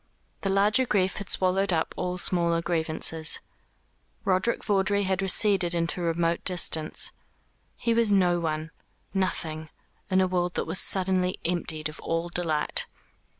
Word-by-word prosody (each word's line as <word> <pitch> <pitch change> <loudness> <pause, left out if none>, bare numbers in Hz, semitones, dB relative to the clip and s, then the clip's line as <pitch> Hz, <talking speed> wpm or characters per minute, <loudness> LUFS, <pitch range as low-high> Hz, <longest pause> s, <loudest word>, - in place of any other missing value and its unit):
The 195 - -1
larger 210 +6 +3
grief 190 -3 +1
had 200 -3 -6
swallowed 190 +1 +2
up 165 -2 0
all 180 0 -3
smaller 170 -2 +2
grievances. 160 -1 -1 0.9
Roderick 190 +4 +1
Vawdrey 200 0 +2
had 190 0 0
receded 190 -2 +2
into 170 +1 0
remote 170 0 0
distance. 165 -4 0 0.6
He 230 - 0
was 230 -2 +2
no 180 -3 +3
one, 160 -1 -3 0.4
nothing, 160 -5 -2 0.4
in 190 -1 +3
a 190 - +4
world 180 -1 -1
that - - -1
was - - 0
suddenly 185 -1 +2
emptied 160 -3 -1
of 155 +1 -9
all 165 +1 -2
delight. 165 -4 -1
180 Hz, 140 wpm, -26 LUFS, 165-195 Hz, 0.9 s, a